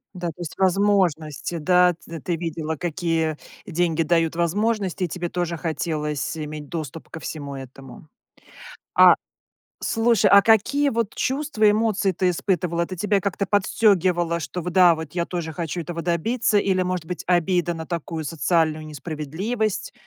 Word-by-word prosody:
Да, 175 Hz, -1 st, -4 dB
то 165 Hz, +2 st, -7 dB
есть 170 Hz, -, -6 dB
возможности, 180 Hz, -5 st, +1 dB
да. 180 Hz, +2 st, +4 dB
Т 165 Hz, -1 st, -7 dB
ты 175 Hz, -, -1 dB
видела 160 Hz, -1 st, -3 dB
какие 165 Hz, -1 st, -1 dB, 0.3 s
деньги 170 Hz, -3 st, 0 dB
дают 165 Hz, 0 st, +1 dB
возможности, 190 Hz, +2 st, 0 dB
и -, -, -3 dB
тебе 175 Hz, +1 st, -4 dB
тоже 175 Hz, -2 st, -2 dB
хотелось 155 Hz, -2 st, -2 dB
иметь 150 Hz, -1 st, -6 dB
доступ 160 Hz, -2 st, -6 dB
ко 160 Hz, -, -8 dB
всему 145 Hz, -3 st, -6 dB
этому. 135 Hz, +2 st, -11 dB, 0.9 s
А -, -, +8 dB, 0.7 s
слушай, 225 Hz, -3 st, +2 dB
а 200 Hz, 0 st, +9 dB
какие 245 Hz, +7 st, +3 dB
вот 230 Hz, -3 st, -1 dB
чувства, 265 Hz, -6 st, +1 dB
эмоции 210 Hz, -3 st, +1 dB
ты 180 Hz, +1 st, +1 dB
испытывала? 170 Hz, -1 st, 0 dB
Это 185 Hz, +2 st, -6 dB
тебя 205 Hz, +2 st, +1 dB
как-то 200 Hz, 0 st, -2 dB
подстёгивало, 185 Hz, -5 st, +2 dB
что 180 Hz, +2 st, -5 dB
в 180 Hz, -, -3 dB
да, 175 Hz, -2 st, +6 dB
вот 160 Hz, -2 st, -7 dB
я 170 Hz, -1 st, -1 dB
тоже 170 Hz, -3 st, -4 dB
хочу 170 Hz, +1 st, -4 dB
этого 170 Hz, +1 st, -5 dB
добиться? 210 Hz, +7 st, +1 dB
Или, 190 Hz, -2 st, +2 dB
может 180 Hz, -3 st, -3 dB
быть, 180 Hz, +1 st, -5 dB
обида 175 Hz, -1 st, +2 dB
на 160 Hz, -1 st, -6 dB
такую 165 Hz, -1 st, -4 dB
социальную 155 Hz, 0 st, 0 dB
несправедливость, 175 Hz, -, -3 dB
175 Hz, 150 wpm, -23 LUFS, 160-195 Hz, 0.9 s, а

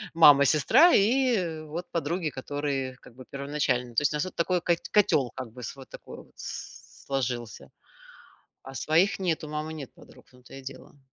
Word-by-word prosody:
мама, 145 Hz, -4 st, +8 dB
сестра 245 Hz, -, +5 dB
и 205 Hz, -8 st, +2 dB
вот, 165 Hz, +4 st, -6 dB
подруги, 170 Hz, 0 st, -1 dB
которые 135 Hz, -1 st, -3 dB
как 125 Hz, -, -17 dB
бы 130 Hz, 0 st, -12 dB
первоначально. 140 Hz, -3 st, -2 dB
То 115 Hz, -, +2 dB
есть 145 Hz, 0 st, +1 dB
у -, -, -1 dB
нас 150 Hz, -, -1 dB
такой 180 Hz, +1 st, +1 dB
ко 175 Hz, -, +2 dB, 0.2 s
котел 145 Hz, -, +3 dB
как 125 Hz, -3 st, -7 dB
бы, 125 Hz, +2 st, -11 dB
с 120 Hz, -, -6 dB
вот 135 Hz, -2 st, -13 dB
такого -, -, -11 dB
вот, -, -, -26 dB
сложился, 125 Hz, -5 st, -6 dB, 0.9 s
а 135 Hz, -, -10 dB
своих 160 Hz, +9 st, +2 dB
нет. 175 Hz, -5 st, -1 dB
У 155 Hz, -, -7 dB
мамы 150 Hz, +1 st, -4 dB
нет 140 Hz, -5 st, -8 dB
подруг, -, -, -17 dB
в -, -, -25 dB
том 125 Hz, 0 st, -20 dB
то -, -, -14 dB
и 135 Hz, -, -9 dB
дело. 135 Hz, +2 st, -11 dB
145 Hz, 190 wpm, -27 LUFS, 130-170 Hz, 0.9 s, мама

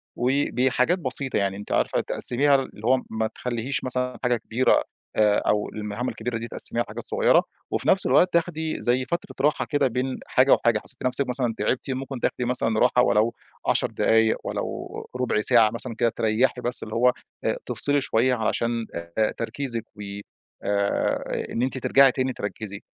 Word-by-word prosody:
وبحاجات 130 Hz, +4 st, +1 dB
بسيطة 130 Hz, -1 st, 0 dB
يعني 100 Hz, -1 st, 0 dB
أنتِ 105 Hz, -, -9 dB
عارفة -, -, +1 dB
تِقَسِميها 140 Hz, +3 st, +2 dB
اللي 135 Hz, -5 st, -3 dB
هو 130 Hz, 0 st, +4 dB
ما 110 Hz, 0 st, -1 dB
تخلّيش 120 Hz, +3 st, -4 dB
مثلًا 125 Hz, 0 st, -2 dB
حاجة 125 Hz, -1 st, +2 dB
كبيرة 115 Hz, +3 st, +2 dB, 0.3 s
آآ 105 Hz, -1 st, +4 dB
أو 105 Hz, 0 st, 0 dB
المهام 105 Hz, +3 st, -4 dB
الكبيرة 125 Hz, -2 st, -4 dB
دي 115 Hz, -, -5 dB
تقسّميها -, -, +3 dB
حاجات -, -, -8 dB
صغيّرة، -, -, +3 dB, 0.3 s
وفي -, -, -2 dB
نفْس 190 Hz, -, +4 dB
الوقت 180 Hz, -, +4 dB
تاخدي 160 Hz, -2 st, -1 dB
زي 125 Hz, +2 st, +1 dB
فترة 170 Hz, +3 st, -4 dB
راحة 150 Hz, -, +1 dB
كده 145 Hz, -2 st, +1 dB
بين 130 Hz, +2 st, -2 dB
حاجة 130 Hz, +2 st, +4 dB
وحاجة، 115 Hz, -2 st, +2 dB
حسّيتِ 130 Hz, +5 st, -9 dB
نفْسِك 130 Hz, +1 st, 0 dB
مثلًا 125 Hz, -2 st, -1 dB
تعبتِ 120 Hz, +6 st, -1 dB
ممكن 130 Hz, 0 st, -4 dB
تاخدي 125 Hz, -, -1 dB
مثلًا 115 Hz, -3 st, 0 dB
راحة 125 Hz, 0 st, +4 dB
ولو 115 Hz, 0 st, +2 dB, 0.3 s
10 -, -, +2 dB
دقايق، 110 Hz, 0 st, +3 dB
ولو -, -, -5 dB
ربع 125 Hz, -4 st, 0 dB
ساعة 115 Hz, -1 st, +5 dB
مثلًا 115 Hz, +1 st, -5 dB
كده 120 Hz, +1 st, +2 dB
تريّحي 115 Hz, +3 st, 0 dB
بس 120 Hz, 0 st, 0 dB
اللي 110 Hz, -, -6 dB
هو 125 Hz, +2 st, +4 dB, 0.3 s
إ -, -, +1 dB
تفصلي 145 Hz, 0 st, +1 dB
شوية 125 Hz, 0 st, +2 dB
علشان 115 Hz, 0 st, -1 dB
آآ 85 Hz, +6 st, -1 dB
تركيزِك 115 Hz, -1 st, -4 dB
و 105 Hz, -, -10 dB, 0.6 s
آآ 100 Hz, 0 st, -1 dB
إن 115 Hz, -, -2 dB
أنتِ 130 Hz, +1 st, -1 dB
ترجعي 135 Hz, +1 st, +5 dB
تاني 130 Hz, 0 st, -1 dB
تركّزي، 105 Hz, -1 st, -6 dB
125 Hz, 170 wpm, -24 LUFS, 110-130 Hz, 0.6 s, ساعة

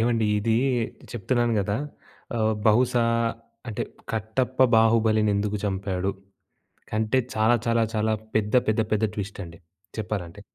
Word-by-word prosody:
ఏవండీ 115 Hz, -1 st, +2 dB
ఇది 110 Hz, +2 st, +1 dB, 0.6 s
చెప్తున్నాను 120 Hz, +2 st, 0 dB
గదా! 100 Hz, +1 st, -1 dB, 0.6 s
ఆహ్, 110 Hz, -1 st, +2 dB
బహుశా 120 Hz, +2 st, +4 dB, 0.6 s
అంటే 110 Hz, -, -3 dB, 0.3 s
కట్టప్ప 110 Hz, +4 st, -2 dB, 0.2 s
బాహుబలిని 110 Hz, -1 st, +4 dB
ఎందుకు 105 Hz, +1 st, -1 dB
చంపాడు? 95 Hz, -1 st, -1 dB, 0.8 s
కంటే 110 Hz, +3 st, +1 dB, 0.2 s
చాలా, 110 Hz, +2 st, +4 dB
చాలా, 115 Hz, 0 st, +3 dB
చాలా 110 Hz, 0 st, +1 dB, 0.2 s
పెద్ద, 105 Hz, +1 st, 0 dB
పెద్ద, 110 Hz, +1 st, +2 dB
పెద్ద 110 Hz, 0 st, +2 dB
ట్విస్ట్ 100 Hz, -1 st, -5 dB
అండి 85 Hz, -1 st, -12 dB, 0.4 s
చెప్పాలంటే. 100 Hz, -4 st, -4 dB
110 Hz, 120 wpm, -25 LUFS, 105-115 Hz, 0.8 s, బహుశా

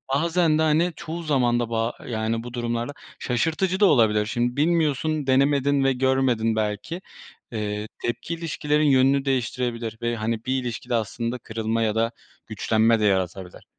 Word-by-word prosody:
bazen 165 Hz, +1 st, +2 dB
de, -, -, +3 dB
hani, 160 Hz, +3 st, +2 dB
çoğu 170 Hz, 0 st, -6 dB
zaman 125 Hz, -6 st, +2 dB
da 120 Hz, -1 st, -2 dB
ba 115 Hz, +1 st, -1 dB
yani, 115 Hz, 0 st, -2 dB
bu 120 Hz, 0 st, -8 dB
durumlarda 120 Hz, +2 st, -2 dB, 0.3 s
şaşırtıcı 165 Hz, -, 0 dB
da 210 Hz, -, +6 dB
olabilir. 110 Hz, -, +4 dB
Şimdi 120 Hz, +3 st, -1 dB
bilmiyorsun, 155 Hz, -2 st, +1 dB
denemedin 140 Hz, +1 st, +3 dB
ve 135 Hz, 0 st, +3 dB
görmedin 130 Hz, -4 st, +1 dB
belki, 110 Hz, -, -3 dB, 0.5 s
eee, 105 Hz, -1 st, -3 dB
tepki 120 Hz, +7 st, -3 dB
ilişkilerin 155 Hz, -2 st, 0 dB
yönünü 135 Hz, +1 st, +4 dB
değiştirebilir 120 Hz, -3 st, -2 dB
ve, 120 Hz, 0 st, -1 dB
hani, 115 Hz, 0 st, -3 dB
bir 130 Hz, 0 st, 0 dB
ilişkide 120 Hz, 0 st, -3 dB
aslında 115 Hz, +2 st, -2 dB
kırılma 115 Hz, 0 st, -2 dB
ya 110 Hz, -1 st, +1 dB
da 115 Hz, +1 st, +1 dB, 0.4 s
güçlenme 110 Hz, +1 st, +2 dB
de 105 Hz, -, +1 dB
yaratabilir. 95 Hz, -2 st, -1 dB
120 Hz, 150 wpm, -24 LUFS, 115-145 Hz, 0.5 s, da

